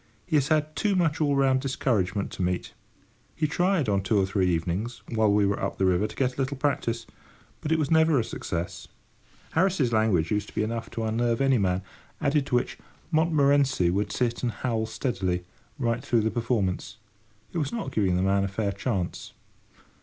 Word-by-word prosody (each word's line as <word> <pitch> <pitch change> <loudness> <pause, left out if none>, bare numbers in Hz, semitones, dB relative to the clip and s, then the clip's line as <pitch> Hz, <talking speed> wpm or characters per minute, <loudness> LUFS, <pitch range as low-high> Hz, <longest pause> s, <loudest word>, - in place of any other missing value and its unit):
He 155 - -1
has 140 -2 +3
had 155 0 +1
too 205 -2 +1
much 165 -4 +1
all 145 -2 +2
round 135 -1 +3
discouragement 105 -8 0
to - - -6
meet. 90 0 -1 0.6
He 155 - 0
tried 175 - +1
on 100 -2 +2
two 100 +2 +2
or 95 - +3
three 95 -1 +1
evenings, 90 +7 -2
while 110 -2 +2
we 100 0 +4
were 100 0 0
up - - -2
the 95 - +2
river, 95 +3 +2
to 110 - -11
get 130 -1 0
a - - 0
little 135 +1 -2
practice, 125 -5 -1 0.6
but 155 - -3
it 160 - +4
was 150 -2 -1
never 160 -2 +5
a - - +1
success. 85 -5 -5 0.6
Harris's 160 -8 +2
language 105 -7 +2
used 105 0 0
to - - -17
be - - +1
enough 115 +1 -3
to 115 -1 -4
unnerve 115 +1 0
any 135 -3 +3
man; 95 -1 0 0.4
added 145 -1 +1
to 125 - 0
which, 120 - -1 0.3
Montmorency 140 - +3
would 100 +2 -1
sit 120 -2 -1
and 120 - 0
howl 115 -2 -2
steadily, 95 -7 -2 0.3
right 120 -2 -1
through 120 -5 +2
the 110 +1 0
performance. 105 -5 -1 0.6
It 170 - -1
was 140 -3 -1
not 120 - -4
giving 95 -4 +1
the 90 - +1
man 100 0 +2
a - - 0
fair 100 +1 -1
chance. 100 -3 -3
115 Hz, 200 wpm, -26 LUFS, 100-140 Hz, 0.6 s, never